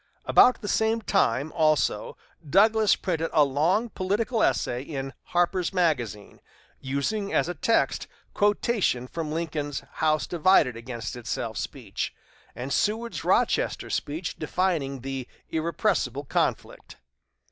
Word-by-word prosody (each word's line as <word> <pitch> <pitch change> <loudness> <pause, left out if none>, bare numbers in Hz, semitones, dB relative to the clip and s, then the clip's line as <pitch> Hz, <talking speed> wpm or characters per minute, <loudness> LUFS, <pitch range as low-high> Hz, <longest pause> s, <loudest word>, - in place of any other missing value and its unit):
About 250 - +5
the 205 - -5
same 220 +2 +1
time, 155 - +1
also, 155 -2 +1 0.3
Douglas 215 +4 +5
printed 165 -3 -2
a 150 - +6
long 170 - +1
political 215 +5 -1
essay 120 +1 +1
in 135 -1 -5
"Harper's 175 0 +1
Magazine," 125 - -1 0.4
using 170 +10 -2
as - - +2
a 175 - -2
text 225 +8 +1 0.3
quotations 205 - +1
from 160 -2 -4
Lincoln's 155 -3 -3
"House 155 -1 +1
divided 170 -7 +3
against 115 -2 -6
itself" 115 -2 -4
speech, - - -5 0.4
and 130 +3 -4
Seward's 225 +3 -1
Rochester - - +1
speech 160 +4 -3
defining 155 -5 -1
the 135 -1 -5 0.2
"irrepressible 165 +1 0
conflict." - - -2
160 Hz, 115 wpm, -26 LUFS, 135-195 Hz, 0.4 s, a